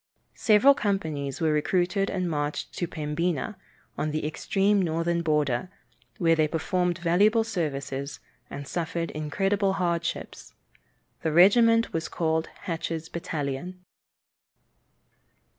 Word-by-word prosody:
Several 225 +6 +6
companies 160 - -2
were 160 -2 +2
recruited 180 +5 +1
and 185 -2 -1
marched 150 -2 -3
to 175 - -2
Pembina, 165 +7 -2 0.4
on 155 - 0
the 155 0 -2
extreme 195 +6 +1
northern 170 0 0
border, 150 -2 0 0.5
where 165 -1 +3
they 155 -1 +2
performed 175 +2 0
valuable 200 +6 +3
services, 140 -9 -3 0.3
and 140 -1 -7
suffered 170 0 -3
incredible 195 +6 0
hardships. 170 -3 -3 0.7
The 160 - 0
regiment 230 +7 +5
was 165 0 -2
called 160 -1 0
Hatch's 165 -2 -4
Battalion. 170 +3 -4
170 Hz, 110 wpm, -26 LUFS, 155-190 Hz, 0.7 s, Several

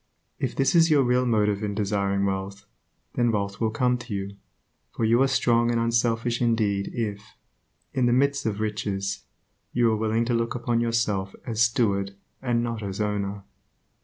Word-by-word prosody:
If - - -2
this 135 +6 +2
is 165 -1 +5
your 145 -3 +5
real 125 0 +2
motive 105 -3 +1
in 100 -1 -2
desiring 100 -1 0
wealth, 100 +1 -3 0.5
then 120 -1 +2
wealth 100 -1 -2
will 110 - +2
come 125 +2 +1
to 120 -4 -6
you; 100 0 -5 0.5
for 115 - -2
you 115 +3 +4
are 135 - +5
strong 120 -3 +2
and 120 -1 +1
unselfish 115 0 +1
indeed 110 -4 +1
if, 105 -3 -5 0.6
in 130 -2 +2
the - - +3
midst 140 +1 +2
of 105 -1 -2
riches, 105 -2 -3 0.5
you 120 -2 +3
are - - +1
willing 110 +2 0
to 120 - 0
look 115 0 0
upon 120 -1 0
yourself 110 -5 0
as 115 -2 -2
steward 100 -4 +1 0.3
and 120 -2 0
not 115 -2 -3
as 100 -1 -5
owner. 100 -1 -2
115 Hz, 175 wpm, -25 LUFS, 100-120 Hz, 0.6 s, is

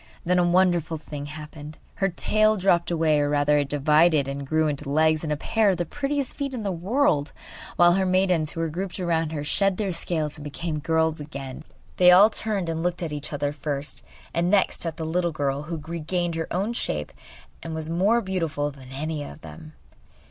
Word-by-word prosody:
Then 180 +1 +3
a - - +4
wonderful 175 -2 +2
thing 145 -2 -7
happened. 150 0 -9 0.2
Her 195 - +1
tail 215 +4 +2
dropped 175 -3 +2
away 160 -3 +2
or, 145 0 +1
rather, 145 0 +3
it 140 -1 -1
divided 150 +1 +3
and 140 0 -5
grew 155 +1 +2
into 150 0 -3
two - - -5
legs 155 +2 +3
and 155 - -2
a 150 - 0
pair 220 +7 +2
of 185 - +1
the 175 - -1
prettiest 280 - -2
feet 275 -2 -3
in 230 - -4
the 200 - -1
world, 180 - +1 0.4
while 175 0 +6
her 190 +1 +2
maidens, 185 -4 +2
who 165 - -4
were 165 - -1
grouped 185 +4 -4
around 165 -3 0
her, 150 -2 -3
shed 195 +5 +1
their 200 -4 -1
scales 160 -3 -2
and 150 - -9
became 150 +2 -4
girls 160 0 +1
again. 140 -3 -7 0.3
They 180 -1 +7
all 195 +5 +8
turned 210 -6 -2
and 165 0 -2
looked 175 +1 -1
at 160 -3 -3
each 145 -1 -5
other 145 0 -2
first, 145 -1 -4 0.3
and 170 +1 +1
next 195 -3 +2
at 160 -1 -4
the 160 - -4
little 170 +2 0
fish 145 -1 -2
who 170 - -3
had 155 -1 -9
regained 170 +1 -2
her 165 0 -3
own 200 +6 -1
shape - - -3 0.5
and 165 -1 -5
was 160 -1 -4
more 200 +8 +3
beautiful 165 -7 -2
than 135 -2 -14
any 150 +2 -3
of 150 - -10
them. 155 -1 -11
165 Hz, 215 wpm, -25 LUFS, 150-180 Hz, 0.5 s, all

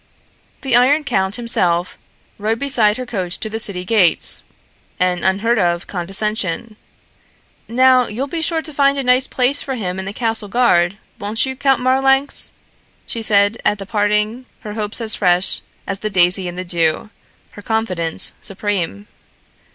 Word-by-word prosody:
The 265 -3 +1
Iron 275 +5 +4
Count 190 -6 0
himself 180 -7 0 0.4
rode 220 +2 -1
beside 230 -6 +2
her 255 - -5
coach 185 -7 -3
to 220 - -5
the 220 - -3
city 185 -4 -3
gates, 195 -5 +3 0.6
an 180 -1 0
unheard 210 +5 +1
of 175 -1 0
condescension. 195 +2 -2 0.9
"Now, 255 +1 +4
you'll 240 +6 -3
be 325 +4 -5
sure 320 0 0
to 310 - -5
find 280 0 +2
a 275 - -1
nice 250 +1 +3
place 265 +3 0
for 265 - -4
him 190 -5 -4
in 190 - -5
the 195 - -4
castle 225 -2 -1
guard, 200 -5 +2 0.2
won't 210 +4 +1
you, 265 0 -5
Count 270 -1 +1
Marlanx?" 270 +2 +2 0.5
she 230 - -1
said 205 0 +3
at 210 - +1
the 195 - -8
parting, 210 +4 -1
her 210 - -7
hopes 210 +1 -4
as 225 -1 +3
fresh 180 -1 +3 0.2
as 195 -1 -4
the 215 - -3
daisy 180 -1 +4
in 175 - -6
the 185 +1 -5
dew, 170 +3 0 0.4
her 205 - -12
confidence 190 -7 -1
supreme. 185 - -3
215 Hz, 160 wpm, -18 LUFS, 190-250 Hz, 0.9 s, Iron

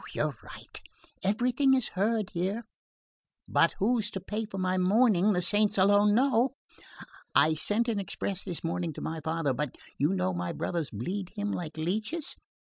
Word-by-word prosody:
You're - - 0
right. - - -8 0.4
Everything 250 +7 +2
is 255 -3 +1
heard 210 +1 0
here. 195 +5 -2 0.8
But - - +3
who's 215 +1 +1
to 195 - -5
pay 210 +4 -4
for 195 - -8
my 185 0 0
mourning 205 0 +4
the 180 -1 +1
saints 205 +3 +3
alone 205 +2 +5
know! 260 +1 +3 0.8
I 155 +3 +5
sent 210 +9 0
an 220 -3 0
express 195 0 -3
this 180 -4 -2
morning 165 0 -2
to - - -8
my 160 0 -4
father, 160 -3 0
but 140 +1 -3 0.2
you 150 +7 +2
know 95 - 0
my 90 0 -3
brothers 165 -5 -2
bleed 180 - -4
him 205 -1 -2
like 165 -4 -5
leeches. 215 - -1
195 Hz, 165 wpm, -29 LUFS, 170-215 Hz, 0.8 s, alone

